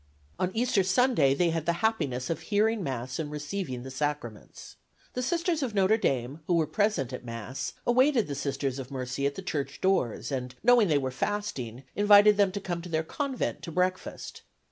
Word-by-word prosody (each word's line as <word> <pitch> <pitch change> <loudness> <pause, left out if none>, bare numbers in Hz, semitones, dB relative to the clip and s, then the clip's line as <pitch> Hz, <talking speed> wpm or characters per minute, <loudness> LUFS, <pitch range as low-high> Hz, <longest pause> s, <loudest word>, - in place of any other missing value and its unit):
On 180 - +1
Easter 235 -3 +2
Sunday 185 - +3
they 170 +2 +2
had 165 -1 -3
the 170 - +3
happiness 135 - 0
of 165 - -2
hearing 215 +5 +1
Mass 130 -4 -4
and 155 -2 -3
receiving 150 -3 -4
the 130 - -8
sacraments. 135 -5 -5 0.4
The 250 - -2
Sisters 335 +3 0
of 245 -6 -2
Notre 195 +2 +4
Dame, 135 - -1
who 175 - +3
were 165 -2 +3
present 200 - 0
at 125 - -6
Mass, 115 +2 -5
awaited 255 0 +3
the 145 - -3
Sisters 140 -1 -2
of 130 -1 -7
Mercy 130 +1 -2
at 140 - -4
the 195 - -7
church 140 -6 -3
doors, 170 - 0
and, 125 -1 -4
knowing 240 -2 +6
they 155 -4 +3
were 130 -2 -1
fasting, 135 - -3
invited 205 0 +7
them 200 -2 +3
to 200 - -2
come 175 -3 -4
to 175 - -9
their 160 -1 0
convent 270 - -3
to 165 - -7
breakfast. 185 +2 -2
165 Hz, 190 wpm, -28 LUFS, 135-205 Hz, 0.4 s, invited